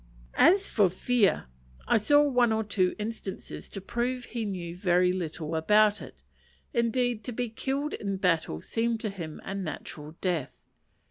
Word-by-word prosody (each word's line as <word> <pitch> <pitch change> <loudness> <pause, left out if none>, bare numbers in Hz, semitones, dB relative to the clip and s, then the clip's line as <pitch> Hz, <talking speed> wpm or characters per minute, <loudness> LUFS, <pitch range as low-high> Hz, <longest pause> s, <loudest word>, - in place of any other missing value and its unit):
As 390 +3 +6
for 205 -4 +3
fear, 205 - +2 0.4
I - - +4
saw 290 +7 +5
one 250 -5 +3
or 220 0 +1
two 190 -3 +1
instances 215 -2 -6
to 195 - -6
prove 245 +5 -2
he 230 -2 -4
knew 175 -4 -4
very 180 -1 +3
little 165 -3 -4
about 210 +6 +4
it: - - -12 0.5
indeed, 235 -1 +1
to 250 - -3
be 245 0 -2
killed 275 +6 -2
in 200 -2 -3
battle 165 - 0
seemed 230 0 -1
to 215 - -2
him 165 -6 -7
a - - -5
natural 155 -4 -6
death. 175 -7 -1
210 Hz, 155 wpm, -28 LUFS, 180-235 Hz, 0.5 s, As